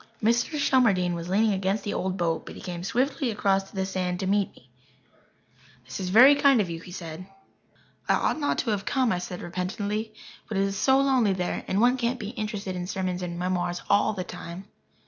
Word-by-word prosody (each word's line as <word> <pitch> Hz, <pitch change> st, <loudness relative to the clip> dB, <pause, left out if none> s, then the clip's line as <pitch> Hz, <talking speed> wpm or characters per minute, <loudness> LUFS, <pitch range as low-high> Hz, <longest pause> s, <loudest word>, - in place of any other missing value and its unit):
Mr. 235 Hz, +7 st, +1 dB
Shelmardine 220 Hz, -11 st, +3 dB
was 170 Hz, 0 st, -5 dB
leaning 210 Hz, +3 st, +3 dB
against 195 Hz, +2 st, -1 dB
the 205 Hz, -, -3 dB
old 190 Hz, 0 st, -2 dB
boat, 165 Hz, -2 st, 0 dB
but -, -, -8 dB
he -, -, -10 dB
came 175 Hz, -2 st, -6 dB
swiftly 260 Hz, +5 st, 0 dB
across 195 Hz, -2 st, +1 dB
the 190 Hz, -1 st, -2 dB
sand 185 Hz, -2 st, -2 dB
to 195 Hz, -, -2 dB
meet 200 Hz, 0 st, +1 dB
me. 125 Hz, -, -20 dB, 1.2 s
"This 130 Hz, +1 st, -7 dB
is 185 Hz, -, -3 dB
very 250 Hz, +9 st, +8 dB
kind 280 Hz, -3 st, +4 dB
of 185 Hz, -5 st, 0 dB
you," 165 Hz, -, -5 dB
he 180 Hz, -, -12 dB
said. 175 Hz, 0 st, -7 dB, 0.8 s
"I -, -, +5 dB
ought -, -, 0 dB
not 290 Hz, -, 0 dB
to 230 Hz, -, 0 dB
have 200 Hz, -2 st, -1 dB
come," 255 Hz, +1 st, +1 dB
I 180 Hz, -, 0 dB
said 180 Hz, 0 st, -6 dB
repentantly. 205 Hz, +5 st, -3 dB, 0.4 s
"But 215 Hz, -, -2 dB
it 195 Hz, -, +3 dB
is 195 Hz, 0 st, -1 dB
so 265 Hz, +6 st, +3 dB
lonely 260 Hz, -7 st, +3 dB
there 180 Hz, -1 st, -2 dB
and 190 Hz, -, 0 dB
one 245 Hz, +3 st, +4 dB
can't 245 Hz, 0 st, -1 dB
be 205 Hz, -, -5 dB
interested 210 Hz, -4 st, -4 dB
in 180 Hz, 0 st, -4 dB
sermons 185 Hz, -1 st, -2 dB
and 175 Hz, -1 st, -4 dB
memoirs 180 Hz, 0 st, -2 dB
all 205 Hz, +1 st, +3 dB
the 185 Hz, -3 st, -4 dB
time." 175 Hz, +2 st, -8 dB
195 Hz, 210 wpm, -26 LUFS, 180-225 Hz, 1.2 s, very